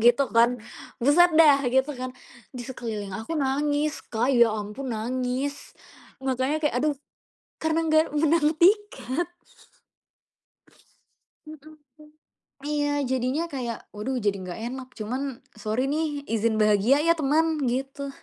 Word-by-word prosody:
gitu 240 Hz, +4 st, +5 dB
kan. 240 Hz, +2 st, +4 dB, 0.4 s
Buset 325 Hz, +7 st, +5 dB
deh 300 Hz, -4 st, +7 dB
gitu 265 Hz, +3 st, +2 dB
kan. 255 Hz, 0 st, -4 dB, 0.4 s
Di 250 Hz, -2 st, -6 dB
sekeliling 215 Hz, -6 st, -5 dB
aku 225 Hz, +9 st, -6 dB
nangis, 290 Hz, +2 st, 0 dB
Kak, 240 Hz, +4 st, +1 dB
ya 235 Hz, -2 st, +5 dB
ampun 215 Hz, +5 st, -5 dB
nangis. 255 Hz, +5 st, -3 dB, 0.5 s
Makanya 265 Hz, +3 st, 0 dB
kayak, 295 Hz, -5 st, 0 dB
aduh, 305 Hz, -1 st, +2 dB, 0.7 s
karena 320 Hz, 0 st, +1 dB
nggak 315 Hz, 0 st, +4 dB
menang 315 Hz, 0 st, +3 dB
tiket. 350 Hz, -, +2 dB, 2.2 s
Mhm, 310 Hz, 0 st, -13 dB, 0.2 s
mmm. 300 Hz, 0 st, -16 dB, 0.5 s
Iya 295 Hz, 0 st, 0 dB, 0.2 s
jadinya 260 Hz, +5 st, 0 dB
kayak, 250 Hz, -6 st, -4 dB, 0.2 s
waduh, 230 Hz, +6 st, -3 dB
jadi 200 Hz, -1 st, +2 dB
nggak 180 Hz, +4 st, -7 dB
enak 260 Hz, 0 st, -7 dB
cuma, 220 Hz, +3 st, -3 dB, 0.4 s
sorry 220 Hz, +5 st, -1 dB
nih 300 Hz, -2 st, -2 dB
izin 225 Hz, 0 st, +1 dB
bahagia 215 Hz, +5 st, +4 dB
ya 335 Hz, -, +5 dB
teman, 315 Hz, +3 st, +2 dB, 0.2 s
gitu. 270 Hz, +2 st, -4 dB
270 Hz, 125 wpm, -25 LUFS, 240-300 Hz, 2.2 s, deh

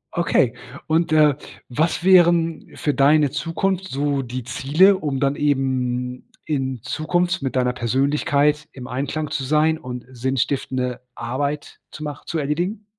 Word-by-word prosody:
Okay. 155 Hz, -8 st, +2 dB, 0.3 s
Und, 160 Hz, 0 st, +1 dB
äh, 150 Hz, -2 st, +5 dB, 0.3 s
was 155 Hz, +7 st, 0 dB
wären 170 Hz, -3 st, +4 dB
für 145 Hz, -, -1 dB
deine 145 Hz, +1 st, +4 dB
Zukunft 175 Hz, +6 st, -1 dB
so 140 Hz, 0 st, 0 dB
die 125 Hz, -1 st, -5 dB
Ziele 145 Hz, -, +3 dB
um 145 Hz, -6 st, -2 dB
dann 140 Hz, 0 st, +1 dB
eben 130 Hz, -3 st, -1 dB, 0.2 s
in 130 Hz, -5 st, -2 dB
Zukunft 175 Hz, +4 st, 0 dB
mit 135 Hz, -1 st, -3 dB
deiner 125 Hz, -1 st, +1 dB
Persönlichkeit 145 Hz, +4 st, +1 dB
im 130 Hz, -2 st, -9 dB
Einklang 145 Hz, +4 st, -3 dB
zu 135 Hz, -, -2 dB
sein 155 Hz, +3 st, +2 dB
und 125 Hz, -1 st, -7 dB
sinnstiftende 130 Hz, 0 st, -2 dB
Arbeit 140 Hz, +5 st, -3 dB
zu 155 Hz, -, -9 dB
mach 145 Hz, -2 st, -6 dB
zu 165 Hz, -, -3 dB
erledigen? 175 Hz, +9 st, -2 dB
145 Hz, 140 wpm, -22 LUFS, 130-155 Hz, 0.3 s, äh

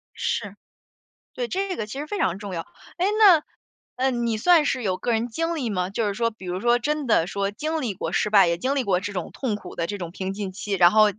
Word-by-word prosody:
是。 -, -, -2 dB, 0.8 s
对， -, -, -3 dB
这 385 Hz, -2 st, -2 dB
个 215 Hz, -, -3 dB
其 245 Hz, +6 st, -7 dB
实 300 Hz, -, -5 dB
非 410 Hz, -, -3 dB
常 185 Hz, -, +1 dB
重 200 Hz, -2 st, -6 dB
要。 165 Hz, -, -2 dB, 0.4 s
哎， 360 Hz, -, +1 dB
那， 375 Hz, -8 st, +7 dB, 0.5 s
呃， 265 Hz, +1 st, +1 dB
你 235 Hz, -2 st, -1 dB
算 325 Hz, +6 st, +5 dB
是 255 Hz, -3 st, 0 dB
有 185 Hz, -3 st, 0 dB
个 240 Hz, -, -1 dB
人 225 Hz, +1 st, +1 dB
经 330 Hz, +8 st, -2 dB
历 265 Hz, -7 st, -2 dB
吗？ 180 Hz, -3 st, -1 dB
就 215 Hz, +2 st, -1 dB
是 200 Hz, -, -1 dB
说 230 Hz, +3 st, 0 dB
比 215 Hz, -4 st, -13 dB
如 180 Hz, +1 st, -3 dB
说 240 Hz, +3 st, +3 dB
真 295 Hz, +3 st, -1 dB
的 175 Hz, -7 st, +3 dB
说 200 Hz, +1 st, -1 dB
经 310 Hz, +9 st, -2 dB
历 230 Hz, -5 st, -2 dB
过 165 Hz, -3 st, -4 dB
失 210 Hz, -, +1 dB
败， 200 Hz, -4 st, +6 dB
也 170 Hz, 0 st, +1 dB
经 265 Hz, +10 st, -1 dB
历 270 Hz, -, +1 dB
过 190 Hz, -5 st, +2 dB
这 200 Hz, +2 st, -5 dB
种 180 Hz, -3 st, -4 dB
痛 245 Hz, -6 st, -2 dB
苦 200 Hz, -3 st, -9 dB
的 170 Hz, -, -2 dB
这 205 Hz, -, -4 dB
种 175 Hz, -3 st, -6 dB
平 190 Hz, +1 st, -4 dB
静 195 Hz, -1 st, -4 dB
期， 205 Hz, +1 st, -5 dB
然 175 Hz, -2 st, +6 dB
后 215 Hz, 0 st, +6 dB
215 Hz, 280 characters per minute, -24 LUFS, 190-275 Hz, 0.8 s, 那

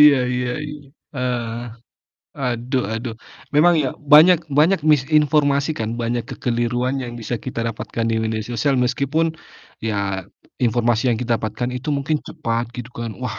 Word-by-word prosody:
Iya, 150 Hz, -2 st, +8 dB, 0.2 s
iya, 125 Hz, 0 st, -1 dB, 0.2 s
iya. 150 Hz, 0 st, -7 dB, 0.4 s
Heeh. 125 Hz, -3 st, -2 dB, 0.9 s
Aduh 125 Hz, 0 st, -1 dB
aduh. 115 Hz, 0 st, -4 dB, 0.4 s
Memang 170 Hz, +4 st, +6 dB
iya. 135 Hz, -, +1 dB, 0.2 s
Banyak 160 Hz, +3 st, +9 dB, 0.2 s
banyak 165 Hz, +4 st, +4 dB
misinformasi 145 Hz, 0 st, +3 dB
kan, 110 Hz, -1 st, -2 dB
banyak 120 Hz, 0 st, -1 dB
kekeliruan 120 Hz, +2 st, -1 dB
yang 120 Hz, -, -6 dB
bisa 115 Hz, +2 st, -3 dB
kita 120 Hz, -2 st, -3 dB
dapatkan 115 Hz, +1 st, -4 dB
di -, -, +1 dB
media 110 Hz, 0 st, -1 dB
sosial 135 Hz, +4 st, 0 dB
meskipun, 140 Hz, +6 st, +1 dB, 0.5 s
ya 100 Hz, -3 st, -1 dB, 0.4 s
informasi 120 Hz, 0 st, +2 dB
yang 115 Hz, -, +1 dB
ki 125 Hz, -, -3 dB
dapatkan 115 Hz, 0 st, -1 dB
itu 130 Hz, +5 st, -5 dB
mungkin 140 Hz, +3 st, 0 dB
cepat, 115 Hz, +1 st, -2 dB
gitu 125 Hz, 0 st, -6 dB
kan. 115 Hz, -1 st, -4 dB
Wah! 125 Hz, -4 st, -4 dB
125 Hz, 150 wpm, -21 LUFS, 115-140 Hz, 0.9 s, Banyak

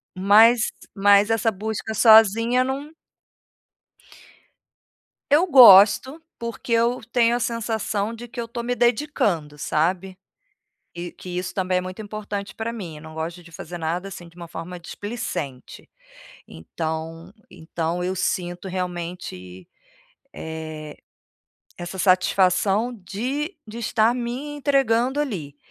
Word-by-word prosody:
Mas, 215 Hz, +5 st, +5 dB, 0.2 s
mas 200 Hz, +1 st, +5 dB
essa 225 Hz, 0 st, +1 dB
busca 220 Hz, +2 st, -4 dB
sozinha 225 Hz, +3 st, +5 dB
num 275 Hz, +4 st, -4 dB, 2.4 s
Eu 305 Hz, +5 st, +5 dB
gosto, 260 Hz, -, +7 dB, 0.2 s
porque 235 Hz, +1 st, -6 dB
eu 235 Hz, +2 st, +2 dB
tenho 240 Hz, -1 st, +3 dB
a -, -, -1 dB
sensação 225 Hz, -2 st, -2 dB
de 240 Hz, +1 st, -10 dB
que 240 Hz, -, -9 dB
eu 230 Hz, -, -3 dB
tô 235 Hz, 0 st, -6 dB
me 245 Hz, -, -1 dB
dedicando, 235 Hz, -, 0 dB
sabe? 180 Hz, +6 st, -1 dB, 0.8 s
E 175 Hz, 0 st, -6 dB
que 185 Hz, -, -12 dB
isso 180 Hz, 0 st, -4 dB
também 185 Hz, -1 st, 0 dB
é -, -, -4 dB
muito 185 Hz, +3 st, -7 dB
importante 205 Hz, -1 st, -6 dB
pra 225 Hz, +1 st, -3 dB
mim, 180 Hz, -9 st, -7 dB
eu -, -, -12 dB
não 160 Hz, 0 st, -11 dB
gosto 165 Hz, +2 st, -5 dB
de 170 Hz, -, -16 dB
fazer 175 Hz, +2 st, -8 dB
nada, 170 Hz, +4 st, -3 dB
assim, 175 Hz, -2 st, -10 dB
de 170 Hz, -, -25 dB
uma 170 Hz, -1 st, -9 dB
forma 170 Hz, +2 st, -8 dB
displicente. 170 Hz, -, -6 dB, 0.6 s
Então, 160 Hz, -, -6 dB, 0.2 s
então 165 Hz, +2 st, -4 dB
eu 185 Hz, +1 st, -1 dB
sinto 180 Hz, 0 st, -3 dB
realmente, 175 Hz, -, -6 dB, 0.7 s
eh, 155 Hz, -1 st, -7 dB, 0.8 s
essa 175 Hz, +2 st, -7 dB
satisfação 190 Hz, +4 st, +2 dB
de 255 Hz, -, -4 dB
de 215 Hz, +2 st, -9 dB
estar 230 Hz, 0 st, +2 dB
me 250 Hz, +4 st, -4 dB
entregando 270 Hz, -2 st, +1 dB
ali, 175 Hz, -, -4 dB
200 Hz, 125 wpm, -23 LUFS, 175-235 Hz, 2.4 s, gosto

